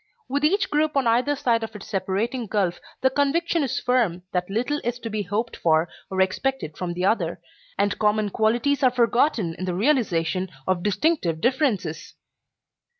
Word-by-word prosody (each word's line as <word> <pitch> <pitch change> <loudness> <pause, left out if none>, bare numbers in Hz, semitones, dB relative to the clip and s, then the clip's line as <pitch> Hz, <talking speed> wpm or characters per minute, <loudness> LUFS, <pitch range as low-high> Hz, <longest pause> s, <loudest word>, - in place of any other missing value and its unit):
With 285 +2 -1
each 390 +7 +2
group 300 0 +1
on 270 - +2
either 245 +5 +2
side 240 -4 +1
of 220 -1 -6
its 210 - -8
separating 220 +5 -2
gulf 190 -4 0 0.2
the 260 - +3
conviction 320 +5 +1
is 270 -4 -1
firm 235 -9 +1
that 180 0 -1
little 245 +8 -1
is 240 +1 -2
to 230 -2 -6
be 215 0 -1
hoped 210 +5 -2
for 160 0 +2 0.2
or 190 0 0
expected 190 - -1
from 175 -2 -4
the 180 +1 -1
other, 220 +4 +1 0.4
and 200 0 0
common 210 -1 +2
qualities 240 +7 +1
are 260 - +6
forgotten 235 - +2
in 185 - -3
the 180 -1 -2
realization 190 - +1 0.2
of 185 -2 0
distinctive 205 - +1
differences. 235 - -1
225 Hz, 170 wpm, -24 LUFS, 190-265 Hz, 0.4 s, are